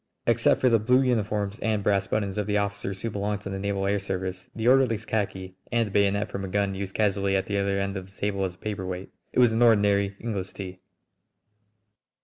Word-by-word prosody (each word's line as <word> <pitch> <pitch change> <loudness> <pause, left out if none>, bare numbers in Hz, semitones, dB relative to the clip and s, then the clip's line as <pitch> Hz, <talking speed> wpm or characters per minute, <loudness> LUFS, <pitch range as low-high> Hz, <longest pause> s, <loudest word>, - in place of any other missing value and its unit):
Except - - +3
for 130 - +3
the 115 -2 +5
blue 125 +5 +4
uniforms 105 -4 0
and 110 -2 0
brass 100 -1 +2
buttons 100 -1 -1
of 105 - -2
the 105 0 +1
officers 100 -1 -3
who 115 - -1
belonged 105 0 -2
to 100 - -6
the 95 - -3
naval 100 0 -1
air 100 +1 +1
service, 95 -1 -4
the 110 +1 -1
orderly's 125 -4 +4
khaki 95 -3 -2 0.2
and 120 -1 +2
the 105 - -7
bayonet 100 +1 +2
from 100 - -4
a - - -3
gun 100 +1 0
used 95 0 -5
casually 100 -2 +1
at 95 - +1
the 100 -1 -1
other 100 0 0
end 100 0 -2
of 95 -1 -5
the - - -21
table 100 -1 -1
as 90 -2 -2
a - - -26
paperweight, 95 -2 -5 0.2
it - - -6
was 120 -3 +5
an 115 - +1
ordinary 100 -3 +4
English 100 -5 -4
tea. 95 -2 -7
100 Hz, 220 wpm, -26 LUFS, 95-105 Hz, 0.2 s, the